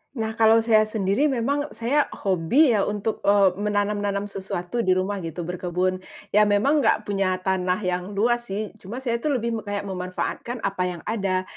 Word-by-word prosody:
Nah, 220 -2 -2
kalau 225 0 +5
saya 215 -1 +4
sendiri 215 +6 +1
memang 280 +2 0
saya 270 +6 +1 0.2
hobi 195 - +3
ya 210 -3 +2
untuk, 210 +1 -2
eee, 200 -2 +5
menanam-nanam 205 -1 0
sesuatu 190 +1 -4
di 185 -5 +3
rumah 195 +2 -1
gitu, 165 0 -5
berkebun. 180 +1 -2 0.3
Ya 210 +1 +5
memang 255 +9 +3
nggak - - +2
punya 195 -2 0
tanah 185 -1 +1
yang 180 +2 -2
luas 240 +3 +1
sih. 205 +2 -4
Cuma 235 +8 -7
saya 235 -2 0
tuh 290 +1 0
lebih 235 -1 -1
me - - -7
kayak 205 0 -2
memanfaatkan 190 +5 -4
apa 195 -2 -1
yang 175 -2 -5
ada. 195 -4 -1
205 Hz, 175 wpm, -24 LUFS, 185-230 Hz, 0.3 s, kalau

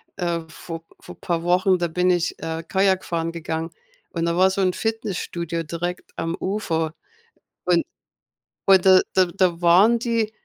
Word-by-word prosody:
äh, 170 -2 -1
vor 165 +1 -8 0.2
vor - - -12
paar 170 -3 -1
Wochen. 185 +2 +3
Da 175 -1 -1
bin 180 +2 +1
ich, 175 -2 +1
äh, 165 0 -4
Kajak 190 -2 +2
fahren 165 -1 -2
gegangen 165 0 -4 0.4
und 165 -1 -2
da 170 0 0
war 185 +2 +5
so 190 +1 -1
'n 185 -1 +2
Fitnessstudio 180 -7 -3
direkt 170 +3 -5
am 165 0 -2
Ufer 165 -5 -2 0.7
und 175 -2 +3 0.8
und 190 -2 +6
da 190 -1 +7
da 185 - +5
da 175 -1 0
waren 190 +7 +5
die 230 -2 0
175 Hz, 160 wpm, -23 LUFS, 165-190 Hz, 0.8 s, da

